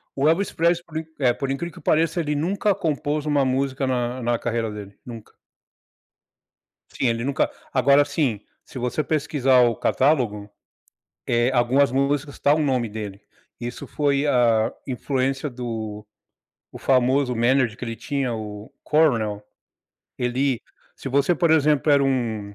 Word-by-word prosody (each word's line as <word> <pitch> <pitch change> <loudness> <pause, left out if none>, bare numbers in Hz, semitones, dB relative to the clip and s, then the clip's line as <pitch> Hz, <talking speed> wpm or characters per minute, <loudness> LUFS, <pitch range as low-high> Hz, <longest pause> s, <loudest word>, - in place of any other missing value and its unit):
O 140 +3 +3
Elvis 190 +5 +1
Presley, 170 +1 +1
por 160 - -7
in 160 - -3
eh, 125 -3 +3
por 135 +1 -3
incrível 165 +5 -4
que - - -12
pareça, 160 +2 +1
ele 150 -2 -2
nunca 195 +7 +1
compôs 155 -5 -2
uma 145 -2 +2
música 135 +1 0
na 125 -1 -1
na 120 0 0
carreira 115 -2 -2
dele, 100 -1 -9
nunca. 115 -3 -10 1.5
Sim, 130 - -1
ele 115 0 0
nunca 140 +2 0 0.2
agora 140 +2 +5
assim, 140 -7 -1 0.2
se - - -11
você 125 +5 -1
pesquisar 140 -4 +2
o 120 -1 +2
catálogo, 120 -9 +1 0.8
eh, 120 +1 +2
algumas 130 +2 +3
músicas 140 +2 -1
tá 145 - +3
o - - 0
nome 130 -6 0
dele, 105 -2 -7 0.4
isso 120 0 -6
foi 145 -1 0
a 115 -5 +3
influência 135 +2 -1
do 110 -4 -6 0.7
o - - -9
famoso 130 0 +2
manager 120 -1 +2
que 125 - -6
ele 115 -1 -4
tinha 135 -1 -2
o 105 -1 -8
Colonel, 115 -10 +2 0.8
ele 125 +1 0 0.3
se - - -7
você, 140 +6 +2
por 170 -1 +1
exemplo, 150 -1 +3
era 140 -1 +5
um 115 -6 -2
130 Hz, 150 wpm, -23 LUFS, 120-145 Hz, 1.5 s, agora